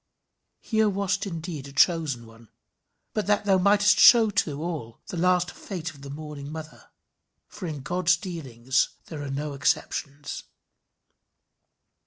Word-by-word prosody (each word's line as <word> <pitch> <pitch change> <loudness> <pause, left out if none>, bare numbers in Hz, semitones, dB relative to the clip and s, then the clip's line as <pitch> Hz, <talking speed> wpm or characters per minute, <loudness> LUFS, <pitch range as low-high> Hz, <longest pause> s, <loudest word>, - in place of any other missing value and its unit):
Thou 220 -1 +4
wast 200 0 -1
indeed 165 -5 -5
a - - -10
chosen 145 -5 +2
one, 115 -1 -17 0.6
but 215 -2 -1
that 205 0 +2
thou 195 -2 +4
mightest 205 +2 +4
show 225 -3 +8
to 155 -8 0
all 150 -9 -5
the - - -5
last 180 +1 +2
fate 175 -6 -6
of 140 -1 -16
the 140 - -9
mourning 145 -1 -7
mother; 155 0 -9 0.6
for 190 -4 -7
in 150 -4 -5
God's 175 +3 +2
dealings 130 -8 -1 0.2
there 155 -3 -7
are 145 - -5
no 145 +2 -3
exceptions. 140 +1 -2
160 Hz, 140 wpm, -26 LUFS, 140-190 Hz, 0.6 s, show